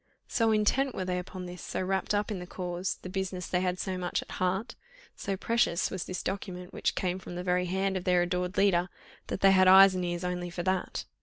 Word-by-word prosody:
So 225 -2 +2
intent 245 +5 +2
were 185 - -2
they 180 0 -1
upon 180 0 -7
this, 180 0 -8
so - - -4
wrapt 190 +2 0
up 205 +1 0
in 200 - -3
the 180 - -8
cause, 180 0 -3
the - - -5
business 185 -1 -3
they 180 - 0
had 180 -1 0
so 185 -1 -3
much 180 -1 -1
at - - -15
heart, 190 +6 0 0.4
so 195 -1 -3
precious 230 -5 +1
was 185 -4 -3
this 185 - -4
document 180 -2 -5
which - - -1
came 185 0 -1
from 175 - -9
the 180 - -4
very 180 0 +1
hand 190 +2 0
of 185 - -2
their 180 -1 +3
adored 180 +1 -2
leader, 180 -3 +3 0.4
that - - -4
they 195 - +7
had 185 -1 +5
eyes 190 +1 +9
and 185 -1 -2
ears 175 0 -2
only 180 0 -2
for 175 0 -4
that. 185 0 -1
185 Hz, 235 wpm, -29 LUFS, 180-195 Hz, 0.4 s, eyes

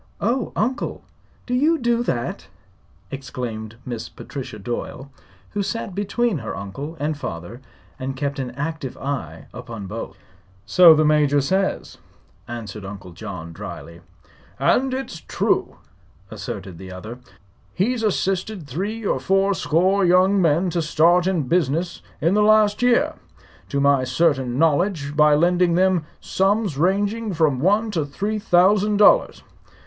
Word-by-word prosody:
"Oh, 235 +3 0
Uncle! 250 +5 -2 0.4
Do 250 - -4
you 305 +6 +3
do 240 -3 +1
that?" 120 - -3 0.6
exclaimed 120 -5 -6
Miss 120 -3 -5
Patricia 130 -6 -8
Doyle, 120 +5 -6 0.4
who 205 - -2
sat 200 -1 -3
between 205 0 0
her - - -5
uncle 140 - -7
and 150 +2 -1
father 105 - -7 0.4
and 130 +1 -4
kept 140 0 -2
an 130 -2 -3
active 145 -2 -4
eye 125 - -5
upon 115 -4 -8
both. 110 +4 -7 0.5
"So 170 - +7
the 155 0 +3
Major 150 -1 +3
says," 190 +8 -1 0.5
answered 110 -4 -7
Uncle 95 -2 -9
John, 90 -3 -8
dryly. 85 +1 -9 0.6
"And 265 +1 +2
it's 260 -10 -4
true," - - 0 0.6
asserted 90 -3 -7
the 95 -1 -9
other. 110 +7 -8 0.5
"He's 230 +6 0
assisted 195 -3 -1
three 205 - -4
or - - +1
four 195 +1 +2
score 185 +3 +2
young 185 +2 +4
men 170 +2 +2
to 170 - 0
start 170 +3 +3
in 180 -5 +1
business 170 +4 0 0.2
in 165 +4 +2
the 210 - +3
last 215 0 +4
year, 245 -1 +3 0.6
to 140 - -1
my 140 -1 +3
certain 130 -2 +1
knowledge, 155 -1 +1
by 150 0 +5
lending 175 +2 +3
them 185 -3 +2
sums 195 -3 0
ranging 200 +6 0
from 155 -5 +2
one 205 - +2
to 165 -6 0
three 205 +10 -3
thousand 205 +1 +3
dollars. 355 - +4
165 Hz, 140 wpm, -22 LUFS, 130-200 Hz, 0.6 s, So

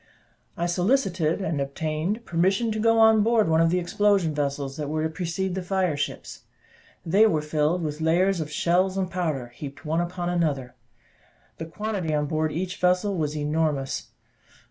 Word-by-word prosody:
I 170 - -1
solicited, 180 - +1
and 160 -6 -1
obtained 155 +10 -3
permission 190 +7 +1
to 215 - -2
go 225 +1 +3
on 220 -1 +6
board 225 -2 +3
one 160 0 +3
of 165 - +4
the 180 - +1
explosion 180 -1 +1
vessels 140 -2 -2
that 150 -2 -4
were 155 +1 -1
to 160 - 0
precede 180 +3 -3
the 190 - -2
fire 185 -3 0
ships. 145 - -5 0.6
They 200 +7 +5
were 155 -7 0
filled 155 +3 0
with 150 0 -4
layers 175 +4 +2
of 155 -2 -3
shells 185 +4 +1
and 185 -2 -1
powder, 155 -9 -2
heaped 140 +5 -9
one 160 +2 0
upon 175 0 -3
another: 150 -8 -1 0.9
the 165 - -5
quantity 190 -3 -3
on 150 0 0
board 155 +1 0
of 155 - -5
each 180 +1 -3
vessel 180 +3 +1
was 155 -3 -2
enormous. 150 -2 -1
170 Hz, 175 wpm, -25 LUFS, 155-190 Hz, 0.9 s, on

